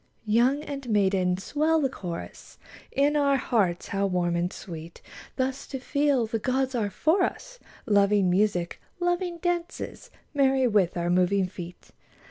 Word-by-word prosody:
Youth 245 +7 +2
and 275 -3 -6
maiden, 190 -3 +2
swell 305 +10 +1
the 280 - +2
chorus 180 -10 -8 0.4
1 280 - +5
In 295 - -3
our 280 -2 +3
hearts 200 -9 0
how 200 0 0
warm 175 -2 0
and 175 +1 0
sweet 165 -3 -9 0.4
Thus 265 +1 -2
to 270 - -5
feel 280 -2 +1
the 225 +1 -2
gods 260 +3 0
are 220 -4 0
for 320 - +2
us. - - -3 0.3
Loving 205 -2 +3
music, 180 -2 +1 0.2
loving 350 0 -1
dances. 345 0 -3 0.2
Merry 270 -2 +3
with 200 -6 +2
our 175 0 0
moving 185 +2 +3
feet 180 -1 -9
225 Hz, 150 wpm, -26 LUFS, 185-280 Hz, 0.4 s, 1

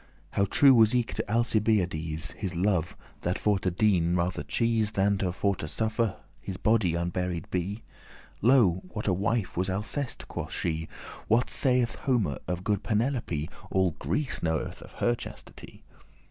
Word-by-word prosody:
How 100 - +2
true 135 +7 +6
was 115 0 +5
eke 120 -2 0
to - - -4
Alcibiades 95 -9 +1
His 95 -4 -4
love, 90 -2 0 0.2
that 90 +1 -1
for 105 -2 +1
to 95 - 0
dien 90 -2 +2
rather 90 +1 0
chese,* 115 -2 +1
*chose - - -15
Than 100 0 +2
for 100 +2 0
to 80 - -5
suffer 110 +3 -1 0.2
his 95 - -6
body 105 -6 +2
unburied 90 +1 -2
be? 95 +5 -2 0.6
Lo, 110 -7 +4
what 105 +3 -5
a 95 - +3
wife 100 +2 -1
was 95 +2 0
Alceste?" 110 +8 -3
quoth - - -5
she. 80 0 -2 0.4
"What 115 +3 +2
saith 125 -3 +2
Homer 110 - 0
of 90 0 -3
good 105 -1 0
Penelope? 110 - -1 0.2
All 95 -2 +2
Greece 145 -3 -1
knoweth 80 -2 -2
of - - -13
her 120 - +1
chastity. 120 - -10
100 Hz, 160 wpm, -28 LUFS, 90-115 Hz, 0.6 s, true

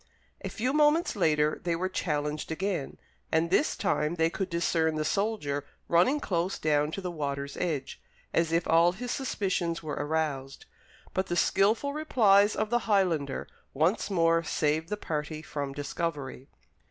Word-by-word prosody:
A - - -3
few 255 +4 -1
moments 300 +2 +3
later, 155 -5 +2
they 170 -1 0
were 185 +3 -1
challenged 150 -4 -2
again, 180 -3 -2 0.3
and 165 +1 +1
this 285 +10 +2
time 170 -5 0
they 165 0 +2
could 190 - -3
discern 165 -2 +1
the 155 0 -1
soldier 195 -10 -1 0.2
running 180 - +3
close 180 -5 -1
down 150 -1 +1
to 195 - -4
the 180 -1 -4
water's 140 -3 -4
edge, 145 -6 -3 0.3
as 165 -1 +2
if 165 +1 +1
all 170 +2 +5
his 245 +6 -5
suspicions 185 - -1
were 155 - -4
aroused; 145 -3 -2 0.5
but 190 0 0
the 175 - -1
skilful 215 - +2
replies 215 -9 +4
of 215 - -1
the 240 -1 0
Highlander 170 -9 +1 0.3
once 170 +10 +1
more 165 -3 +3
saved 160 0 0
the 210 - -2
party 155 -3 -4
from 145 -3 -4
discovery. 145 -2 -4
170 Hz, 155 wpm, -29 LUFS, 150-195 Hz, 0.5 s, all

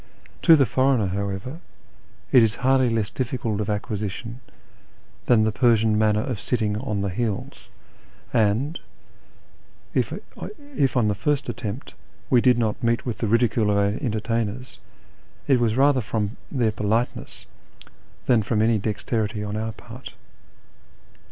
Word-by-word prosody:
To 165 - +8
the 140 -3 +4
foreigner, 130 -1 +2
however, 100 - -4 0.7
it 125 - +7
is 110 -2 +2
hardly 130 -1 +4
less 110 -2 -1
difficult 120 -4 -2
of 105 - -3
acquisition 105 +3 -4 0.9
than 115 -3 +5
the 110 - +2
Persian 110 -2 +3
manner 105 0 +2
of 125 -7 -3
sitting 110 -4 -1
on 105 -2 -2
the 100 - -1
heels; 105 +1 -4 0.6
and 115 +7 +1 1.1
if, - - 0 0.2
on - - -7 0.3
this 135 -2 +2
our 105 -4 +3
first 140 +7 -1
attempt, 115 +1 -5 0.4
we 125 -2 +6
did 125 -1 +4
not 110 -3 -1
meet 115 0 0
with 120 -5 -3
the 115 - -1
ridicule 115 -1 +2
of 100 - +2
our 100 0 +2
entertainers, 115 +1 -2 0.7
it 135 -3 +4
was 115 -1 +1
rather 135 -1 +4
from 105 0 -2 0.2
their 120 -6 +1
politeness 110 +3 -2 0.8
than 120 -3 +4
from 105 +1 0
any 110 -1 +3
dexterity 105 0 -2
on 105 0 -4
our 110 +1 -2
part. 120 +4 -11
115 Hz, 140 wpm, -24 LUFS, 105-125 Hz, 1.1 s, To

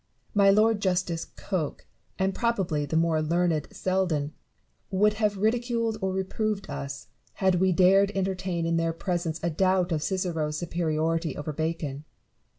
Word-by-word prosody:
My 200 -1 +5
Lord 215 +1 +4
Justice 180 -3 0
Coke, 175 -7 -3 0.3
and 190 0 +1
probably 185 - 0
the 160 - 0
more 165 -1 +2
learned 165 -1 +1
Seldon, 175 -6 -1 0.6
would 210 +2 +3
have 205 -2 +2
ridiculed 230 +1 0
or 190 0 0
reproved 195 +2 -2
us, 140 0 -6 0.2
had 190 -2 +2
we 190 0 +3
dared 195 +3 +5
entertain 185 -3 -1
in 165 0 +1
their 165 0 0
presence 170 -1 -2
a 170 - +1
doubt 185 +1 +2
of 155 -2 0
Cicero's 165 -5 -1
superiority 165 -1 -1
over 150 +1 -4
Bacon. 155 -2 -3
180 Hz, 145 wpm, -27 LUFS, 160-195 Hz, 0.6 s, My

